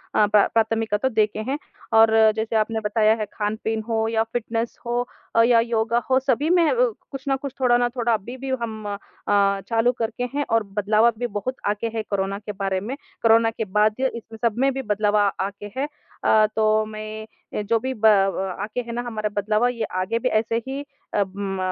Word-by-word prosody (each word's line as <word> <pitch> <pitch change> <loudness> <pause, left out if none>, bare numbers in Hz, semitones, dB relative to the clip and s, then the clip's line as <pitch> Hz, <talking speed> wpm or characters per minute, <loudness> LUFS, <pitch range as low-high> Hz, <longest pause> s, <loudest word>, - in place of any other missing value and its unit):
अ, 210 - +5
प्रा 205 -1 +5
प्राथमिकता 225 +1 +1
देखे 215 -3 +1
हैं 280 - 0 0.4
और 225 0 +6 0.2
जैसे 220 +1 -2
आपने 220 +1 +1
बताया 215 0 +3
है 215 - -1
खान-पीन 220 +1 -2
हो 220 -1 +1
या 225 0 +1
फिटनेस 230 0 -2
हो 240 +1 0 0.3
अ, 230 - +6
या 235 0 +5
योगा 230 0 +1
हो 260 0 +4
सभी 270 +3 0
में 345 -2 +4 0.4
कुछ 270 -1 -7
न 270 - +3
कुछ 280 -2 -5
थोड़ा 245 -2 +4
ना 245 0 +1
थोड़ा 240 -1 0
अभी-भी 245 +6 -4
हम 220 -2 -5 0.4
अ, 200 -1 +3
चालू 230 +1 +3
करके 230 +2 -2
हैं 290 0 0
और 225 -1 +3
बदलावा 210 +3 +2
भी 245 +2 -2
बहुत 230 +4 -4
आ - - +3
गया 230 +2 -3
है - - +1
कोरोना 195 0 -1
के 210 0 -6
बारे 195 -1 -2
में 235 +7 -4 0.3
कोरोना 225 0 +5
के 225 0 -4
बाद 210 +2 +2 0.2
इस 230 - -6 0.2
सब 230 -3 +1
में 270 +1 +3
भी 270 - -3
बदलाव 210 -2 0
आगे 200 0 -1
है। 275 - +1 0.4
अ, 215 0 +5
तो 215 0 +3
मैं 215 0 -7
जो 230 +2 +2
भी 260 +3 -3
ब 220 -3 -3
अ 195 -2 +2
आके 215 +4 -3
है 235 -1 -8
ना 240 - -2
हमारा 220 -3 -3
बदलावा 215 +3 +2
ये 235 -2 -3 0.2
आगे 220 +5 -1
भी - - 0
ऐसे 225 +1 +1
ही 270 +1 -3 0.3
अम 195 -1 -1
220 Hz, 200 wpm, -23 LUFS, 210-235 Hz, 0.4 s, और